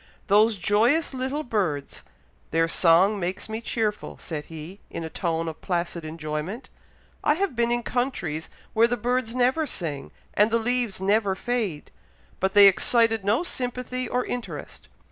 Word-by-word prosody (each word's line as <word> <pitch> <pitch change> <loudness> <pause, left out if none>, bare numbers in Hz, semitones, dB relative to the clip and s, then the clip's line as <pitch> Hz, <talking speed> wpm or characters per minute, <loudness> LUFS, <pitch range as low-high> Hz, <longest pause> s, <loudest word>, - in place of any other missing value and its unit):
"Those 210 +2 +4
joyous 230 - +2
little 265 +4 -2
birds! 175 - -2 0.5
their 165 +1 +2
song 180 +5 +4
makes 185 +1 -3
me 220 +1 -4
cheerful," 220 -3 -2
said 150 -3 -6
he, 165 +5 -9
in 165 - -5
a 160 - -6
tone 165 -2 -1
of 160 - -6
placid 170 -2 -2
enjoyment. 155 - -5 0.5
"I 295 - +4
have 380 -5 -1
been 235 0 +2
in 240 0 0
countries 190 - -2 0.2
where 230 +1 +5
the 245 +1 -1
birds 245 -1 -1
never 255 +5 +2
sing, 150 - -5 0.2
and 210 +1 +4
the 230 - +2
leaves 240 -3 -1
never 200 0 +2
fade; 215 -9 -3 0.5
but 190 +1 0
they 205 -1 +10
excited 225 +2 +4
no 210 - +2
sympathy 250 -4 -3
or 250 0 0
interest. 245 -1 -6
215 Hz, 155 wpm, -25 LUFS, 170-245 Hz, 0.5 s, they